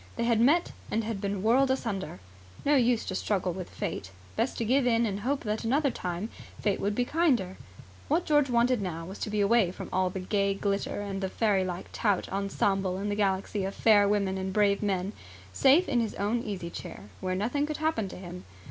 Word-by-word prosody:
They - - -1
had 235 -1 +3
met 310 +8 +4 0.2
and 225 - 0
had 215 -3 -4
been 200 -1 -2
whirled 260 +5 +4
asunder. 210 - -2 0.5
No 290 - +4
use 245 -3 +3
to - - -4
struggle 185 -2 -1
with 185 0 -6
Fate. 95 -2 -4 0.3
Best 260 - -1
to 230 - -1
give 255 +3 +3
in 230 -1 +3
and 200 -2 -2
hope 270 +6 -1
that 215 0 -2
another 275 +4 +2
time 180 +1 -4 0.3
Fate 205 -2 0
would 205 +1 -1
be 245 - +1
kinder. 250 - +1 0.5
What 325 +5 +1
George 295 -3 +3
wanted 240 -1 +3
now 165 -3 -4
was 190 +3 -8
to - - -3
be 210 0 0
away 205 -2 +4
from 180 - -7
all 185 0 +2
the 190 - -5
gay 200 +1 0
glitter 200 0 -2
and 200 -1 -4
the 190 - -1
fairylike 190 -4 0
tout 205 -4 +1
ensemble 195 -1 0
and 205 +2 -2
the - - 0
galaxy 195 0 0
of 195 +1 -3
fair 205 -2 +5
women 200 -2 +1
and 190 0 -3
brave 200 0 +2
men, 195 -1 -1 0.4
safe 285 - +5
in 245 - +2
his 225 -2 -1
own 210 +4 0
easy 185 -7 -5
chair, 105 -9 -9
where 185 0 -2
nothing 245 +10 0
could 305 - -3
happen 310 -10 0
to - - -9
him. 180 -1 -9
205 Hz, 210 wpm, -28 LUFS, 190-235 Hz, 0.5 s, fair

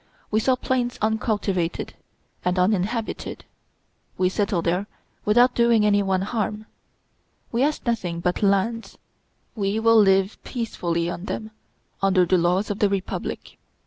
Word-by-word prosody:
We 215 - +3
saw 255 +3 +2
plains 250 -1 -1
uncultivated 210 -5 -1 0.5
and 180 +1 0
uninhabited. 210 +4 -1 0.7
We 185 -1 +2
settled 195 -3 -1
there 180 +4 0 0.4
without 240 +4 +5
doing 235 -2 +3
any 205 -1 +4
one 190 -1 0
harm.... 215 0 -3 0.9
We 235 - 0
ask 295 +1 0
nothing 190 -8 -1
but 180 +4 -1
lands. 205 +3 0 0.6
We 205 0 -1
will 230 0 +5
live 195 0 +2
peacefully 175 -8 -2
on 175 +1 -5
them 220 +1 -5 0.5
under 190 -2 +4
the 180 +1 +3
laws 180 +5 +1
of 205 - -4
the 205 - +3
republic." 195 -2 -4
205 Hz, 135 wpm, -24 LUFS, 185-225 Hz, 0.9 s, without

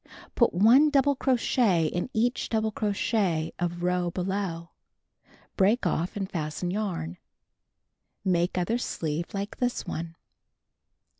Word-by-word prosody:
Put 235 - +3
1 235 - +6
double 285 -1 +3
crochet 240 - +2
in 175 +7 -2
each 240 +3 0
double 220 -1 0
crochet 200 -6 0
of 175 0 -2
row 180 -1 +1
below. 180 -2 -3 0.8
Break 210 +4 +3
off 175 0 -1
and 195 -2 -2
fasten 165 +1 -3
yarn. 180 - -3 1.1
Make 175 -1 +1
other 200 +7 0
sleeve 160 -7 -3
like 200 +1 -4
this 245 -1 -1
one. 165 +1 -5
190 Hz, 120 wpm, -27 LUFS, 170-220 Hz, 1.1 s, 1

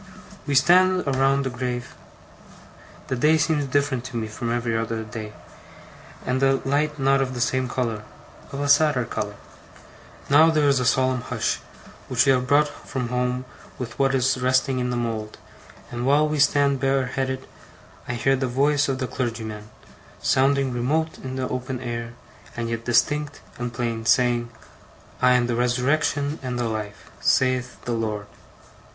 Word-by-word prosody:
We 140 - 0
stand 185 +6 +5
around 135 0 +2
the 130 - -2
grave. 125 0 -4 1.1
The 130 - -2
day 150 +6 +4
seems 150 -1 +1
different 140 -2 0
to 125 -2 -5
me 110 - -2
from 115 +2 -4
every 120 -1 -1
other 115 0 -2
day, 110 -1 -7 0.9
and 130 +1 0
the 135 0 +3
light 150 +2 0
not 135 0 +3
of 130 -1 -2
the - - -4
same 130 +1 0
colour 115 -4 -2 0.5
of 140 - -5
a 145 - -1
sadder 145 -3 +4
colour. 105 -2 -4 0.9
Now 155 +3 +6
there 155 -2 +2
is 140 -2 +3
a 125 - -1
solemn 130 -1 +2
hush, - - -1 0.5
which 120 -2 +2
we 135 - +5
have 125 -1 +1
brought 145 +3 +4
from 130 -4 -5
home 125 +1 -1 0.3
with 120 -2 -7
what 135 -1 +3
is 130 0 +1
resting 130 +1 +2
in 125 0 -1
the 125 - -1
mould; 110 -2 -3 0.5
and 120 0 -4
while 145 +4 +4
we 150 0 -2
stand 140 -1 +3
bareheaded, 130 0 -1 0.6
I 125 - -2
hear 135 +3 +2
the 130 0 -1
voice 140 +3 +2
of 135 - 0
the 130 - -2
clergyman, 110 -4 -4 0.5
sounding 135 0 +2
remote 155 +7 -1
in 130 0 -5
the 130 -1 -2
open 125 0 -4
air, 115 -1 -5 0.4
and 115 0 -2
yet 115 0 -4
distinct 145 +5 +1 0.2
and 120 0 -3
plain, 115 -2 -3
saying: 120 +1 +3 0.7
'I 125 0 +5
am 125 -1 +3
the 120 -1 -1
Resurrection 140 +5 0
and 125 -2 -3
the 120 -1 -1
Life, 105 -6 -6
saith 130 -1 +1
the 120 - -2
Lord! 110 -3 -2
130 Hz, 165 wpm, -24 LUFS, 120-140 Hz, 1.1 s, Now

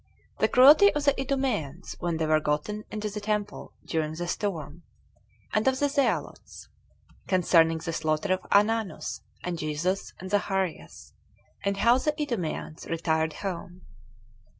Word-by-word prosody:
The - - +4
Cruelty 295 +11 +7
Of 295 - 0
The 280 - +5
Idumeans 245 - -2
When 170 -2 -1
They 160 - 0
Were 155 0 +3
Gotten 155 +9 -2
Into 215 0 -4
The 210 0 -5
Temple 210 0 -3
During 155 -1 -2
The 175 +1 -4
Storm; 170 -5 -3 0.7
And 215 +3 +1
Of 265 0 +3
The 285 - +2
Zealots. 280 -1 -2 0.6
Concerning 165 -3 +4
The 165 +1 -5
Slaughter 155 +4 0
Of 185 - -4
Ananus, 215 0 +1 0.2
And 175 -2 -3
Jesus, 160 +6 -2
And 185 +1 -8
Zacharias; 195 -4 -2 0.5
And 200 0 0
How 235 +5 +4
The 300 +3 -1
Idumeans 195 - -3
Retired 160 -1 0
Home. 180 -1 -5
185 Hz, 140 wpm, -27 LUFS, 160-215 Hz, 0.7 s, Cruelty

